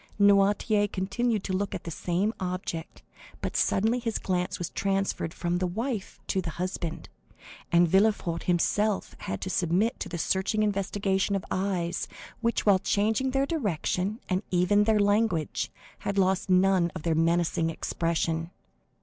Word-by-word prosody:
Noirtier 205 +1 +4
continued 205 +3 -1
to 190 - -3
look 200 +2 -1
at - - -6
the 165 - -6
same 185 +7 -1
object, 180 -3 -4 0.4
but - - -4
suddenly 225 +5 +2
his 230 -2 -2
glance 180 -1 -1
was 175 - -4
transferred 195 -4 -1
from 175 +1 -1
the 185 - 0
wife 220 +3 -4
to 190 - 0
the 175 - -4
husband, 170 -1 -4 0.6
and 175 0 +5
Villefort 190 -2 +2
himself 200 +4 +1
had 95 - -4
to 185 - -3
submit 185 +7 +1
to 190 - -4
the 175 - -4
searching 190 +5 +1
investigation 200 -1 0
of 195 - -3
eyes, 185 -2 -1 0.3
which, 235 0 0
while 200 -3 +5
changing 220 +8 +1
their 270 +1 +1
direction 205 - -1
and 185 0 0
even 185 +3 +3
their 220 -1 +3
language, 205 -6 +1 0.3
had 200 - -3
lost 190 0 +2
none 185 -1 +4
of 165 - -6
their 165 - +1
menacing 165 0 +2
expression. 165 0 -1
190 Hz, 150 wpm, -28 LUFS, 175-205 Hz, 0.6 s, and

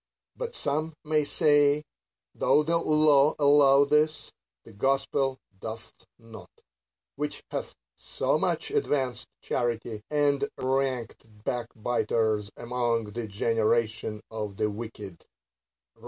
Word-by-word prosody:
But 485 -1 -5
some 155 - -2
may 155 0 +1
say, 145 0 +3 0.5
though 150 - +3
the 165 +2 +1
law 150 -2 +4
allow 140 -1 +6
this, 150 0 +1 0.3
the 115 - -15
gospel 135 +3 0 0.2
doth 110 +2 -7 0.2
not; 115 -2 -13 0.7
which - - -4
hath - - -4 0.2
so - - -1
much - - -1
advanced 130 -4 -1 0.2
charity, 115 -2 -2
and 145 +5 +1
ranked 130 -3 -2 0.2
backbiters 115 -3 -1
among 120 -2 -1
the 115 -1 -4
generation 110 +1 0
of 105 -3 -5
the 105 - 0
wicked 105 -4 -8 0.7
(Rom. - - -29
125 Hz, 110 wpm, -27 LUFS, 110-145 Hz, 0.7 s, allow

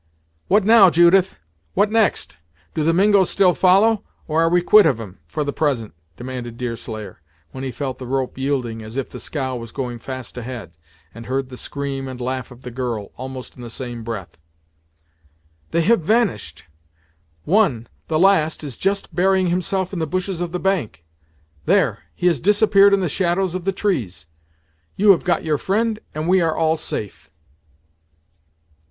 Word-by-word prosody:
"What 205 +2 +4
now, 215 -2 +7
Judith? 175 +3 +4 0.4
What 210 - +2
next? 215 - +1 0.4
Do 155 - -1
the 165 - +3
Mingos 195 +1 +4
still 185 -2 +3
follow, 200 +5 +4 0.2
or 160 0 +1
are 165 - +3
we 175 0 +2
quit 210 0 +7
of 130 -7 +1
'em, 95 -6 -9
for 150 - -2
the 145 -1 -3
present," 130 -8 -1 0.2
demanded 120 -2 -6
Deerslayer, 115 -5 -6 0.3
when 130 - -7
he 135 - -3
felt 130 +1 -5
the 130 - -7
rope 130 0 -2
yielding 130 -4 -2
as 110 +3 -8
if 135 - -3
the - - -8
scow 130 -4 -3
was 115 -1 -8
going 125 -3 -5
fast 130 0 -7
ahead, 115 -8 -7 0.4
and 115 0 -10
heard 135 0 -2
the 130 - -9
scream 135 0 -5
and 130 -1 -7
the - - -5
laugh 130 -1 -3
of 125 +1 -15
the 125 - -7
girl, 120 -4 -4
almost 130 0 -8
in 125 - -12
the 120 - -7
same 120 0 -6
breath. 110 -6 -6 1.3
"They 170 - +1
have 205 +4 +3
vanished! 160 - 0 0.8
One 170 - +2 0.2
the 155 - 0
last 160 -4 +3
is 140 -6 -7
just 195 -2 -1
burying 185 +1 +2
himself 185 +1 -1
in 185 - -3
the 160 - -1
bushes 185 +2 -3
of 175 -1 -3
the 180 - -3
bank 135 - -2 0.6
There, - - +2 0.2
he - - -4
has 170 -6 +3
disappeared 205 - +5
in 195 - -2
the 180 - 0
shadows 180 +2 0
of 185 -1 -5
the 195 - +2
trees! 130 - -2 0.7
You 205 +1 +6
have 185 - +2
got 175 -3 0
your 150 -2 0
friend, 215 +2 0 0.2
and 155 +1 -3
we 185 +1 +4
are 165 -2 0
all 160 0 +2
safe!" 80 - -5
155 Hz, 180 wpm, -21 LUFS, 125-190 Hz, 1.3 s, now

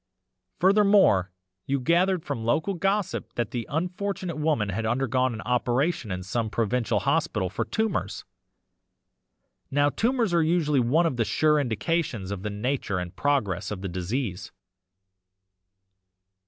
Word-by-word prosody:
Furthermore, 195 - +4 0.4
you 140 0 +1
gathered 175 +5 +2
from 115 - -3
local 155 - +1
gossip 195 +2 -1
that 120 -2 -2
the 120 -2 -4
unfortunate 180 +1 -3
woman 150 -9 0
had 105 +4 -2
undergone 130 +2 +1
an 110 -1 -6
operation 125 +2 0
in 90 0 -3
some 110 +4 -2
provincial 115 0 0
hospital 140 - 0
for 110 +3 -2
tumours; 120 - -2 1.4
now 145 +1 +3
tumours 230 - +1
are 170 - +4
usually 155 -3 +2
one 140 +8 +3
of 135 -7 -1
the 115 - +2
sure 150 +6 +2
indications 120 - -1
of 100 -2 -4
the 105 - -3
nature 105 -1 -2
and 90 0 -5
progress 105 - 0
of 100 -2 -6
the - - -2
disease. 95 +1 -3
130 Hz, 135 wpm, -26 LUFS, 105-165 Hz, 1.4 s, Furthermore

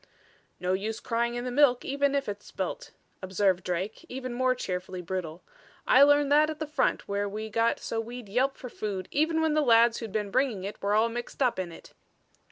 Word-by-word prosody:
"No 180 +1 0
use 215 +4 -2
crying 235 +1 -1
in 240 - -3
the 250 - -3
milk 250 -2 +4
even 280 0 +1
if 280 - -1
it's 205 0 -6
spilt," 190 -2 -4 0.3
observed 190 -1 +1
Drake, 185 - -3
even 255 -1 -5
more 255 +1 +2
cheerfully 185 -5 -4
brutal. 175 -2 -5 0.4
"I 260 - +6
learned 290 0 +5
that 305 +1 +5
at 310 - -4
the 310 - -3
front 300 - 0
where 200 0 -1
we 215 +2 -6
got 230 +2 +1
so 225 - -3
we'd 240 0 -8
yelp 255 +7 0
for 255 - -8
food 205 -5 -4
even 320 +2 +1
when 315 -1 +2
the 305 - +3
lads 235 -3 +5
who'd 225 -3 -6
been 210 -1 -2
bringing 250 -6 +1
it 200 +2 -6
were 205 +1 +1
all 220 +2 +4
mixed 240 +3 -3
up 245 -6 +1
in 180 -2 -3
it." 165 - -13
230 Hz, 210 wpm, -28 LUFS, 195-265 Hz, 0.4 s, I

